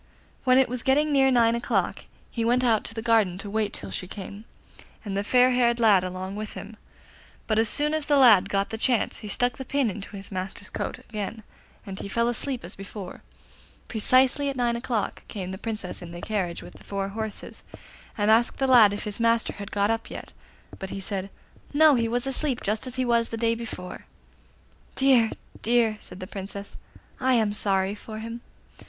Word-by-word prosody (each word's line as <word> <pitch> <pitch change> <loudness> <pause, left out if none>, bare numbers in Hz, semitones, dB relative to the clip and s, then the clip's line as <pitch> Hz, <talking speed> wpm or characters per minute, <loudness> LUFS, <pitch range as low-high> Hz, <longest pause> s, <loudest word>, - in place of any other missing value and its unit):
When 255 0 +5
it 265 - +5
was 250 0 -3
getting 290 +4 +2
near 270 -2 +5
nine 235 -3 +4
o'clock 235 +1 -1 0.3
he 230 - -2
went 245 +2 +2
out 225 -4 +3
to 225 - -3
the 225 - -4
garden 220 -6 +3
to 200 +1 -4
wait 215 -1 0
till 100 - -3
she 100 - -3
came, 200 +2 -8 0.6
and 200 -2 -3
the 200 - 0
fair 250 +4 +4
haired 240 -1 +2
lad 210 -5 +5
along 185 +1 -5
with 215 0 -5
him; 215 +2 -9 0.7
but 215 -1 +1
as 225 -1 +2
soon 300 +1 +1
as 310 -2 -2
the 290 - +4
lad 215 -8 +7
got 195 0 0
the 225 - -4
chance 240 -2 +1
he 215 - -8
stuck 245 +3 -1
the - - -3
pin 265 -3 0
into 200 +1 -8
his 195 - -10
master's 190 +2 -5
coat - - -3
again 220 -2 -6 0.4
and 195 -2 -7
he - - -5
fell 235 +4 +1
asleep 250 +2 -2
as 180 - -6
before. 195 -1 -8 0.7
Precisely 260 +5 +3
at 275 - -3
nine 240 -2 +1
o'clock 235 -3 -2
came 185 -3 -5
the 190 - -6
Princess 215 -5 -4
in 175 - -8
the 175 +1 -8
carriage 185 -4 -2
with - - -13
four 195 -1 -3
horses, 220 +1 -5 0.6
and 210 0 +3
asked 235 +2 +3
the 270 - +1
lad 235 -6 +7
if 205 - -4
his 210 +1 -4
master 230 0 +2
had 200 -1 -8
got 205 +1 +1
up 225 0 -3
yet; - - -8 0.5
but 190 - -5
he 195 - -5
said 195 0 -4 0.5
'No, 310 0 +7
he 235 -3 +2
was 240 +2 -1
asleep, 270 -1 +1
just 215 +5 -1
as 255 - -6
he 255 -1 0
was 235 -1 +2
the 225 - -4
day 230 0 +2
before.' 225 -6 -7 0.9
'Dear! 260 -4 +4 0.3
dear!' 230 -2 +2
said 180 - -11
the 185 - -5
Princess, 200 +1 -8 0.4
'I 260 0 +2
am 220 -3 +2
sorry 195 -1 +1
for 215 +1 -9
him. 230 +2 -6
225 Hz, 205 wpm, -26 LUFS, 200-245 Hz, 0.9 s, lad